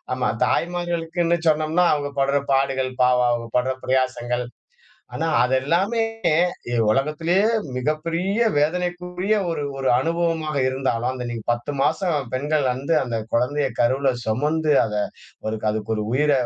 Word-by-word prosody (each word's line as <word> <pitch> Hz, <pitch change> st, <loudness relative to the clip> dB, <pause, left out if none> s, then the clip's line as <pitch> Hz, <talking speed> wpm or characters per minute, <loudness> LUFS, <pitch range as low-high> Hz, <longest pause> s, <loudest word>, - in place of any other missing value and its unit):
ஆமா 125 Hz, -1 st, 0 dB, 0.2 s
தாய்மார்களுக்குன்னு 170 Hz, 0 st, 0 dB
சொன்னோம்னா 155 Hz, +3 st, +2 dB
அவங்க 145 Hz, -1 st, -2 dB
படுற 140 Hz, +1 st, +2 dB
பாடுகள். 135 Hz, -1 st, +1 dB
பாவம்! 125 Hz, -1 st, +3 dB
அவங்க 120 Hz, -1 st, -2 dB
படுற 130 Hz, +1 st, +1 dB
பிரயாசங்கள். 125 Hz, -2 st, 0 dB, 0.7 s
ஆனா 165 Hz, -, -1 dB, 0.2 s
அது 125 Hz, +1 st, 0 dB
எல்லாமே, 190 Hz, -, +1 dB, 0.7 s
எ -, -, -1 dB, 0.2 s
உலகத்திலயே 160 Hz, -, +1 dB, 0.3 s
மிகப்பெரிய 170 Hz, -, 0 dB
வேதனைக்குரிய 180 Hz, +5 st, 0 dB
ஒரு 155 Hz, -3 st, -2 dB
ஒரு 135 Hz, -, -2 dB
அனுபவமாக 165 Hz, -1 st, -1 dB
இருந்தாலும், 130 Hz, -2 st, -1 dB
அந்த 125 Hz, -1 st, -5 dB
நீங்க 115 Hz, -2 st, -5 dB
10 120 Hz, +5 st, -3 dB
மாசம் 155 Hz, -3 st, 0 dB
பெண்கள் 145 Hz, +2 st, 0 dB
வந்து, 135 Hz, +6 st, -2 dB
அந்த 120 Hz, -3 st, -3 dB, 0.2 s
குழந்தைய 135 Hz, +4 st, +1 dB
கருவுல 130 Hz, +3 st, +2 dB
சுமந்து, 150 Hz, +7 st, 0 dB
அத 105 Hz, -1 st, -4 dB, 0.5 s
ஒரு 110 Hz, 0 st, -2 dB
அதற்கொரு 110 Hz, 0 st, -2 dB
உயிர, 150 Hz, +2 st, +3 dB
145 Hz, 130 wpm, -22 LUFS, 130-165 Hz, 0.7 s, பாவம்